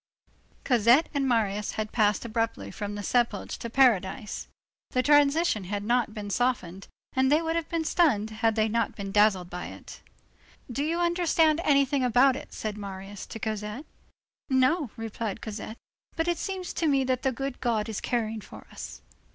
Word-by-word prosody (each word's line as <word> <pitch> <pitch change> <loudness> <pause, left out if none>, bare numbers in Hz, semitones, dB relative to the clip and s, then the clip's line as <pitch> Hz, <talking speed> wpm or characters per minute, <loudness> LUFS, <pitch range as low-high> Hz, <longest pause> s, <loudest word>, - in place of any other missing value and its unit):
Cosette 245 +4 +4
and 280 -2 0
Marius 210 -3 0
had 215 -1 -3
passed 210 0 +2
abruptly 225 0 -2
from 205 -1 -5
the 205 - -5
sepulchre 240 +3 0
to 235 - -5
paradise. 225 -3 +2 0.4
The 255 - +1
transition 290 - +3
had 200 +2 -3
not 235 +1 +1
been 205 -1 -5
softened, 195 -7 -1 0.3
and 265 +1 +2
they 300 - +5
would 325 0 -2
have 335 -2 -2
been 335 -1 -1
stunned, 225 - +2
had 220 0 +1
they 220 -1 +2
not 230 0 -1
been 195 -1 -5
dazzled 195 -4 +3
by 180 0 -5
it. - - -11 0.7
"Do 275 +4 -1
you 330 +3 -1
understand 340 -2 +2
anything 280 -2 +3
about 250 +2 +4
it?" - - -8
said 210 -1 -5
Marius 195 0 -7
to - - -7
Cosette. 215 +4 -4 0.6
"No," 265 +3 +2
replied 225 -2 -4
Cosette, 220 +1 -7 0.4
"but 325 +1 -1
it 345 -2 0
seems 380 -2 -4
to 330 - 0
me 275 -2 +3
that 255 -1 0
the 265 - +1
good 270 +1 -4
God 225 -3 0
is 220 -3 -4
caring 225 -2 -1
for - - -12
us." - - -8
235 Hz, 175 wpm, -27 LUFS, 210-280 Hz, 0.7 s, they